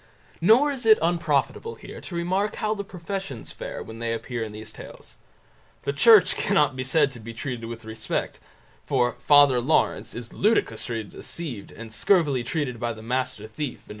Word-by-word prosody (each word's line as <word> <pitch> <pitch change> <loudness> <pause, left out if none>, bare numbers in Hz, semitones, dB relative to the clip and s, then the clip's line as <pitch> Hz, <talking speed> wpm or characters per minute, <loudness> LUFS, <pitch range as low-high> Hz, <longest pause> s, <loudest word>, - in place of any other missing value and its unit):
Nor 240 - +5
is 265 -3 -4
it 220 - +8
unprofitable 165 - 0
here - - -10
to 175 - -8
remark 185 +5 0
how 215 0 0
the 200 -2 -4
professions 190 - -6
fare - - -6
when 110 0 -10
they 115 0 -1
appear 115 0 -4
in 110 - -6
these 105 +1 -8
tales. - - -12 0.7
The 140 - -1
Church 195 +3 +6
cannot 150 -9 +2
be 130 - -3
said 140 +2 +3
to 125 - -10
be 115 +1 -9
treated 120 -1 -5
with 115 -1 -8
respect, 110 0 -3 0.4
for 125 -3 +1
"Father 145 -4 +6
Lawrence" 120 -5 +1
is 120 0 -7
ludicrously 130 - 0
deceived 120 - -7
and 115 -1 -10
scurvily 145 - +2
treated 125 -3 -2
by 120 -1 -1
the 110 0 -11
Master 125 -2 -2
Thief, 125 +5 -5
No. - - -21
135 Hz, 175 wpm, -25 LUFS, 115-175 Hz, 0.7 s, it